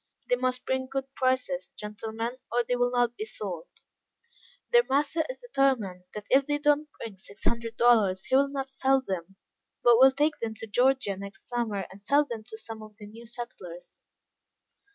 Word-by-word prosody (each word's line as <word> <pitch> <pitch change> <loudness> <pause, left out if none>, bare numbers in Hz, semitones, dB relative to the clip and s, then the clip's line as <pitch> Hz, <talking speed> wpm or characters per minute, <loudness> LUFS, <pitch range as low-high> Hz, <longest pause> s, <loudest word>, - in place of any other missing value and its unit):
They 245 - +5
must 255 0 -1
bring 260 0 -1
good 270 0 -4
prices, 260 0 0
gentlemen, 220 +2 -4 0.2
or 240 +1 +2
they 245 - 0
will 245 0 +2
not 245 -1 +1
be 215 - -4
sold. 195 -6 -5 1.0
Their 480 0 +7
master 295 +4 +2
is - - -5
determined, 260 - 0
that 210 -1 -5
if 270 +1 +5
they 290 0 +1
do 295 0 +2
not 300 +1 -10
bring 205 -5 -8
six 200 +2 -12
hundred 230 -1 -1
dollars, 215 -6 +4
he 260 - +2
will 275 +1 +4
not 270 -1 -4
sell 270 0 +3
them, 190 0 -4 0.5
but 240 -1 +7
will 265 +1 +9
take 295 +3 +1
them 225 -1 -3
to 225 - -7
Georgia 245 -1 +2
next 200 +1 -9
summer, 220 -5 -1
and 195 - -13
sell 285 +8 +3
them 230 -5 -6
to 220 -1 -9
some 220 0 -6
of 215 -1 -12
the 210 - -10
new 225 +3 -12
settlers. 190 -8 -8
240 Hz, 190 wpm, -28 LUFS, 210-270 Hz, 1.0 s, will